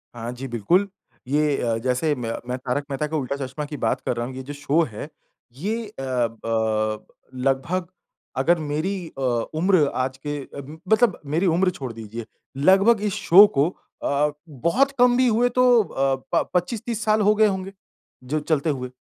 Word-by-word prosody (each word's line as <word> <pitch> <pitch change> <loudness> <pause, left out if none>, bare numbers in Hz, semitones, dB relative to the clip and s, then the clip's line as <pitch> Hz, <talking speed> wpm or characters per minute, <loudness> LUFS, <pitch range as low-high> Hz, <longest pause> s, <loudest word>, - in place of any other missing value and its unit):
हाँ 120 0 -5
जी, 130 +2 -6
बिल्कुल, 130 - +2 0.4
ये 150 +1 +2
अ, 115 -2 0
जैसे 130 +4 +1
मैं 120 -3 -4 0.2
मैं 125 - -1
तारक 130 +2 -2
मेहता 145 +3 -1
का 155 +1 -2
उल्टा 140 -1 -2
चश्मा 135 +4 -5
की 145 0 -7
बात 115 -2 0
कर - - 0
रहा 120 - -1
हूँ 130 +1 -7
ये 130 - -5
जो 145 +3 -7
शो 145 +3 +1
है 105 - -7 0.5
ये 220 +9 -3
अ, 205 - -14
ब 110 -4 -1 0.3
अ, - - -10
लगभग 140 +7 0 0.5
अगर 165 +6 +3
मेरी 155 +6 -2 0.2
अ, - - -5
उम्र 150 +7 +2
आज 130 0 -1
के 145 0 -2 0.2
म 150 +4 -11
मतलब 220 -3 +4
मेरी 155 +6 0
उम्र 180 +2 +3
छोड़ 130 -8 -6
दीजिए, 115 0 -7 0.3
लगभग 195 +9 +5
इस 205 -3 0
शो 195 +5 +7
को 145 +5 +4 0.3
अ 145 +1 +1 0.2
बहुत 170 - +1
कम 245 0 +6
भी 255 0 +4
हुए 240 +2 +3
तो 250 +1 +2 0.2
अ, 135 -6 0 0.2
प - - +2
25-30 220 +5 -1
साल 215 0 +3
हो 210 +1 +5
गए 215 0 +5
होंगे। 190 -1 -3 0.5
जो 145 +5 -1
चलते 155 0 0
हुए 125 -3 -3
145 Hz, 185 wpm, -23 LUFS, 130-190 Hz, 0.5 s, शो